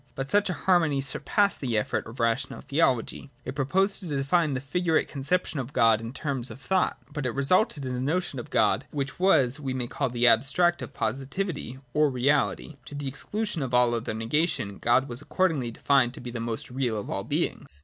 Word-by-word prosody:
But 135 +1 -4
such 205 -1 +3
a - - 0
harmony 165 -4 +2
surpassed 200 +9 +1
the 120 -5 0
efforts 105 - -1
of 115 - -12
rational 115 +2 0
theology. 140 -2 0 0.2
It - - -4
proposed 185 +9 +1
to 185 - -7
define 145 +1 +1
the - - -1
figu 165 +4 -1
rate - - +2
conception 150 +3 -1
of 130 +2 -5
God 115 -6 +4
in 115 0 -6
terms 135 -2 -3
of - - -9
thought; 185 +5 +1 0.2
but 145 -4 -2
it 120 - -4
resulted 140 +1 +2
in 130 - -3
a 125 - -2
notion 150 +1 -1
of 120 - -8
God 105 +3 +2
which 140 +1 -4
was 145 -8 +3
what 145 - -10
we 130 - 0
may 125 -2 -2
call 135 +3 -2
the 120 0 +1
abstract 145 +9 +4
of - - -8
positivity 135 - -3 0.2
or 150 -1 +4
reality, 140 +3 0
to 145 - -9
the 145 -1 -4
exclusion 205 +6 -3
of 130 -2 -1
all 125 -1 +5
negation. 115 - -1
God 120 +3 +3
was 120 +1 -2
accordingly 155 -7 0
defined 125 +1 +2
to - - -9
be 120 0 -7
the 120 - -5
most 115 +1 -4
real 125 -4 -1
of 105 - -5
all - - -2
beings. 75 - -2
135 Hz, 210 wpm, -27 LUFS, 120-160 Hz, 0.2 s, all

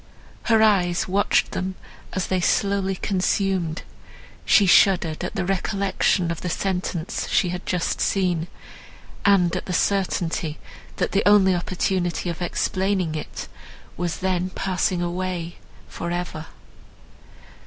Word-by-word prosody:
Her 225 -2 +4
eyes 180 -5 +2
watched 200 +2 +2
them 185 0 -3 0.4
as 185 -2 -1
they 185 0 0
slowly 195 0 +1
consumed, 185 -3 -1 0.6
she 205 - +6
shuddered 175 -3 +4
at 180 - -4
the 190 - -1
recollection 195 -2 0
of 165 - -5
the 180 - -3
sentence 180 -2 -2
she 180 - +2
had 180 +1 -5
just 180 -2 -1
seen, 180 -4 +1 0.8
and 190 -4 +4
at - - -3
the 180 - -2
certainty, 180 -3 0 0.4
that - - -1
the 200 - +2
only 195 -2 +5
opportunity 175 0 -1
of 170 - -8
explaining 185 -1 0
it 155 - -6 0.5
was 175 0 -3
then 185 -1 0
passing 185 -1 -1
away 175 -1 -3 0.3
for 170 - -5
ever. 175 -2 -4
185 Hz, 125 wpm, -23 LUFS, 175-195 Hz, 0.8 s, she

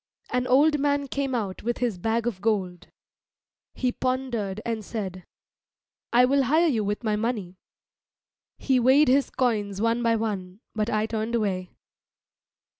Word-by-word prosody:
An 250 0 0
old 295 +4 +4
man 285 0 +1
came 270 -1 -2
out 200 -5 -3
with 240 +2 -2
his 235 -7 -1
bag 225 +4 0
of 215 -6 -3
gold. 185 -5 -1 0.9
He 250 -1 0
pondered 245 -7 -2
and 225 -2 -2
said, 190 -5 -5 0.9
"I 245 +1 +6
will 275 +1 +2
hire 315 +7 +3
you 240 -10 +1
with 205 +3 -2
my 215 -2 +1
money." 210 -5 -3 1.0
He 260 -2 +2
weighed 260 +4 +5
his 275 +2 +3
coins 210 -6 -1
one 230 +2 +1
by 230 -1 +2
one, 200 -4 -3
but 215 0 -1
I 215 0 +1
turned 225 +1 -2
away. 190 -5 -1
230 Hz, 150 wpm, -25 LUFS, 205-255 Hz, 1.0 s, I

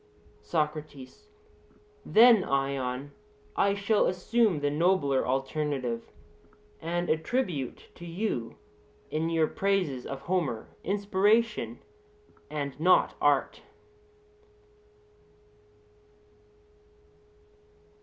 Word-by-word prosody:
SOCRATES: 150 - -4 0.8
Then, 225 -2 +6
Ion, 135 0 -2 0.4
I 200 - +2
shall 205 +1 +2
assume 190 0 +1
the 145 0 +1
nobler 150 -4 +2
alternative; 135 -2 -2 0.7
and 175 +2 -2
attribute 160 - -2
to 175 - -11
you 165 - -3 0.6
in 160 +2 -1
your 165 -1 +2
praises 180 -8 -1
of 135 0 -6
Homer 160 -12 -2
inspiration, 205 +3 +1 0.7
and 145 -2 -4
not 180 +3 +4
art. - - +2
160 Hz, 75 wpm, -28 LUFS, 140-195 Hz, 0.8 s, Then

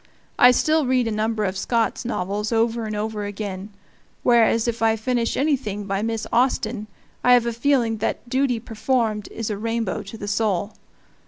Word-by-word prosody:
I 245 - +9
still 310 +3 +2
read 255 -2 +2
a - - -1
number 215 0 -1
of 190 0 -2
Scott's 230 +3 0
novels 210 -1 -2
over 230 0 +1
and 215 - -4
over 210 0 -3
again, 205 -1 -5 0.5
whereas 230 -1 +4
if 230 -1 -2
I 225 0 +3
finish 230 +1 -1
anything 250 -9 -1
by 195 0 -1
Miss 225 0 -2
Austen 235 -3 +1 0.4
I 250 - +6
have 245 -1 +5
a 235 - -1
feeling 235 -2 +1
that 220 +3 -3
duty 260 -1 +1
performed 225 -2 -1
is 225 -1 -4
a 200 - -4
rainbow 225 -2 -2
to 205 +2 -9
the 205 - -6
soul. 205 -1 0
225 Hz, 175 wpm, -23 LUFS, 210-240 Hz, 0.5 s, I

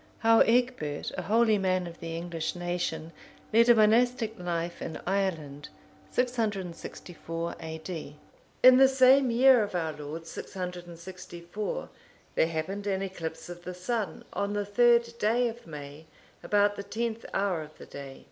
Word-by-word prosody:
How 225 0 +5
Egbert, 235 - +1
a - - -3
holy 220 0 +3
man 185 -1 +1
of 170 -1 -9
the 165 0 -5
English 170 -1 -3
nation, 175 -2 -3 0.4
led 230 +2 +6
a 240 - +8
monastic 225 +1 +3
life 170 -1 -3
in 160 - -5
Ireland. 165 -7 -2 0.4
[664 185 -7 -3
A.D.] 160 -2 -6 0.5
In 255 0 +9
the 270 0 +8
same 265 0 +5
year 250 +1 +6
of 205 -3 -3
our 160 -3 -1
Lord 150 +2 -7
664, 180 - -6 0.4
there - - +3
happened 170 +6 -4
an 195 -1 0
eclipse 175 -4 -6
of 175 0 -9
the 180 0 -6
sun, 195 -1 -3
on 200 0 -1
the 205 0 -1
third 235 +2 +4
day 235 +4 +2
of 235 -4 -8
May,(484) 150 0 -12
about 205 0 +3
the - - -3
tenth 225 +2 -3
hour 195 -4 0
of 155 0 -11
the - - -11
day. 140 -1 -9
190 Hz, 145 wpm, -28 LUFS, 165-225 Hz, 0.5 s, In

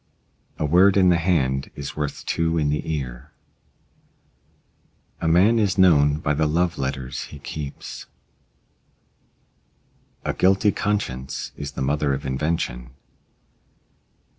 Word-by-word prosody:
A - - -1
word 95 +6 +5
in 95 -2 +5
the 85 - +4
hand 70 -7 0
is 70 -1 -6
worth 75 -2 -4
two 85 0 0
in 75 -2 +1
the 75 +2 -2
ear. 65 -6 -5 1.9
A 80 - -2
man 95 +8 +4
is 100 -2 +1
known 75 -6 +5
by 75 -1 -1
the 75 +1 +1
love 85 +2 0
letters 65 -1 -3
he 75 - -11
keeps. 70 0 -7 2.2
A - - 0
guilty 95 +3 +3
conscience 80 -14 -3
is 70 0 -6
the 70 - -3
mother 70 0 +1
of 70 - -7
invention. 65 -3 -2
75 Hz, 120 wpm, -23 LUFS, 70-90 Hz, 2.2 s, word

